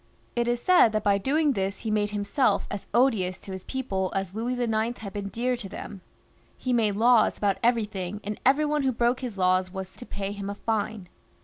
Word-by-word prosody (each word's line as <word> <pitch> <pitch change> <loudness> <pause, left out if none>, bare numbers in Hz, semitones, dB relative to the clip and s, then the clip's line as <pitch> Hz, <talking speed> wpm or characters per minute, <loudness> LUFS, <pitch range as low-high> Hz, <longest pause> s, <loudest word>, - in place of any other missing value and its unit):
It 240 0 +1
is 240 0 +1
said 295 -7 +5
that 215 -1 0
by 200 -1 +3
doing 290 +6 +2
this, 195 -2 -2
he 220 - -2
made 210 -1 +1
himself 210 +6 +1
as 200 - -5
odious 205 -7 +2
to 195 - -9
his 190 -1 -6
people 195 -8 -2
as 195 -1 -2
Louis 230 +4 -2
IX. 235 -1 0
had 200 -3 -8
been 200 -1 -4
dear 245 +4 -1
to 225 -5 -7
them. 200 0 -8 0.6
He 255 - -1
made 215 -4 +2
laws 235 +2 +4
about 200 -2 0
everything, 210 -5 0
and 210 +1 -4
every 280 +4 +4
one 300 0 +1
who 265 -1 +2
broke 240 +2 +1
his 245 -6 -5
laws 185 0 +2
was 190 0 -6
to 245 - -10
pay 195 0 -4
him 200 -1 -5
a 200 - -4
fine. 215 -3 -2
215 Hz, 215 wpm, -26 LUFS, 195-245 Hz, 0.6 s, said